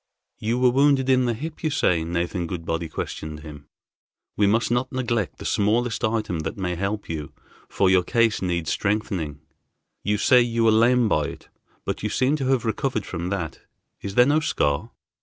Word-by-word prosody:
"You 115 +3 -1
were 125 0 +4
wounded 135 0 +3
in 130 -1 +4
the 120 -1 0
hip, 155 +6 -7
you 155 - +2
say," 90 - +1
Nathan 85 +1 -2
Goodbody 80 -1 -3
questioned 75 0 -5
him. 75 -2 -11 0.7
"We 105 - +3
must 115 +3 +2
not 125 +2 0
neglect 120 -6 -1
the - - -9
smallest 115 +3 +1
item 110 -6 0
that 80 +4 -4
may 90 -2 -2
help 100 +4 -3
you, 75 -3 -5 0.4
for 100 - +2
your 95 -1 +5
case 115 +3 +1
needs 85 -3 -1
strengthening. 95 -8 -2 0.6
You 105 +1 +1
say 125 +4 +5
you 115 -1 0
were 115 - +5
lamed 115 +1 +4
by - - +2
it - - -9 0.4
but - - -3
you - - -1
seem 130 +3 +1
to 135 -3 -2
have 130 -3 +1
recovered 110 -1 -1
from 85 0 -4
that. 90 -5 -3 0.4
Is 100 0 -6
there 125 - +7
no 145 +3 +3
scar?" 70 - 0
105 Hz, 185 wpm, -24 LUFS, 85-125 Hz, 0.7 s, there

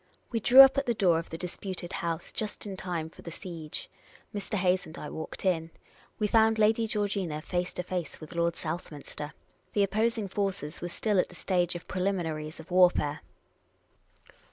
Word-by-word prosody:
We 230 - +1
drew 250 +5 +9
up 270 0 +8
at 275 - -4
the 235 - +2
door 175 -5 +4
of 165 - -7
the 165 - -5
disputed 180 0 -5
house 170 0 -2
just 215 0 -3
in 200 -2 -5
time 175 -4 -3
for - - -14
the - - -7
siege. 165 -3 -6 0.5
Mr. 205 +1 -3
Hayes 185 -1 +2
and 160 - -10
I 150 - -6
walked 160 +4 -6
in. 165 -3 +1 0.5
We 215 - +1
found 220 +1 +4
Lady 220 +1 +3
Georgina 200 -7 -1
face 175 +3 -2
to 180 - -3
face 180 -3 -4
with 155 - -10
Lord 170 0 +1
Southminster. 155 -2 -6 0.4
The 205 -1 +4
oppos 220 +4 +1
ing 210 -3 -2
forces 190 -6 -2
were 175 - -3
still 205 +2 +1
at - - +2
the 180 - -13
stage 175 -1 0
of 175 - -7
preliminaries 165 -5 -2
of 160 +3 -12
warfare. 180 -5 +4
180 Hz, 185 wpm, -29 LUFS, 165-205 Hz, 0.5 s, drew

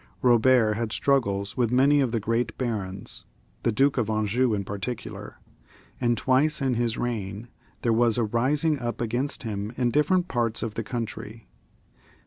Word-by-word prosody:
Eobert 120 -2 +5
had 115 -1 -2
struggles 100 -9 0
with 120 -3 +1
many 140 +3 +4
of 130 -4 0
the 115 - 0
great 115 +1 -1
barons, 105 -7 -4 0.4
the 120 - +1
Duke 135 +4 +2
of 110 -3 -1
Anjou 110 +2 +1
in 100 - -2
particular; 100 +5 -6 0.6
and 120 -1 +1
twice 135 +7 +2
in 135 -2 +1
his 120 -1 -1
reign 110 -1 -4 0.3
there 115 - +3
was 115 0 +3
a 120 - +2
rising 135 +7 +1
up 120 -2 -4
against 120 +5 -2
him 105 -2 -4
in 120 -2 +1
different 170 +7 +2
parts 115 -5 -1
of 115 - -3
the 115 - -3
country. 115 -1 -6
120 Hz, 160 wpm, -26 LUFS, 110-130 Hz, 0.6 s, Eobert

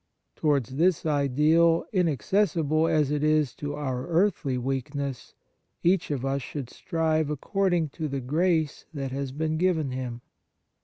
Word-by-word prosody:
Towards 140 -4 0
this 175 +1 +2
ideal, 155 +3 +3
inaccessible 165 - +1
as 150 -3 +2
it 150 0 0
is 155 -4 +2
to 145 0 -4
our 130 -3 -3
earthly 170 -6 +1
weakness, 135 +1 -4 0.5
each 180 +1 +2
of 135 -3 -2
us 135 +1 -1
should 130 -1 -6
strive 160 -2 0
according 175 +2 0
to 155 +2 -4
the 140 -1 -3
grace 155 +3 0
that 135 -2 -3
has 135 0 -3
been 155 +3 -1
given 160 -5 +1
him. 125 -2 -5
150 Hz, 140 wpm, -27 LUFS, 135-165 Hz, 0.5 s, ideal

